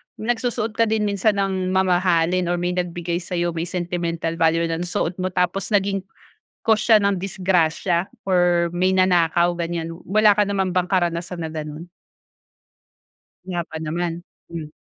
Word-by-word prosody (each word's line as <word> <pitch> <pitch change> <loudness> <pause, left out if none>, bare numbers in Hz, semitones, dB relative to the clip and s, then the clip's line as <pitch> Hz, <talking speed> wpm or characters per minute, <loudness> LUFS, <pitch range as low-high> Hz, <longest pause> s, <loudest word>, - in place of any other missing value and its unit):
nagsusuot 230 0 -1
ka 230 0 +3
din 220 0 +1
minsan 205 0 +1
ng 190 -2 -1
mamahalin, 180 -1 +2
or 175 - +1
may 175 0 -1
nagbigay 175 -1 -2
sa'yo, 175 -1 -1
may 165 - -1
sentimental 170 -2 -2
value 165 +1 +3
ng 165 +1 -2
suot 175 0 -1
mo, 185 - 0
tapos 185 +2 0
naging, 195 -1 +1 0.6
cause 220 -1 +5
siya 220 -2 +7
ng 200 -2 +1
disgrasya 180 -1 0 0.2
or 175 -2 +3
may 185 +1 +2
nanakaw, 175 -2 +3
ganyan. 165 -1 -3 0.2
Wala 210 +1 +5
ka 210 - +6
naman 195 -2 0
bang 180 -1 +2
karanasan 175 -1 -1
na 160 - -4
gano'n? 155 +1 -7 1.6
Wala 175 -2 -2
pa 160 - -6
naman? 170 +2 -3 0.3
Hmm. 160 -3 -6
180 Hz, 150 wpm, -22 LUFS, 170-195 Hz, 1.6 s, siya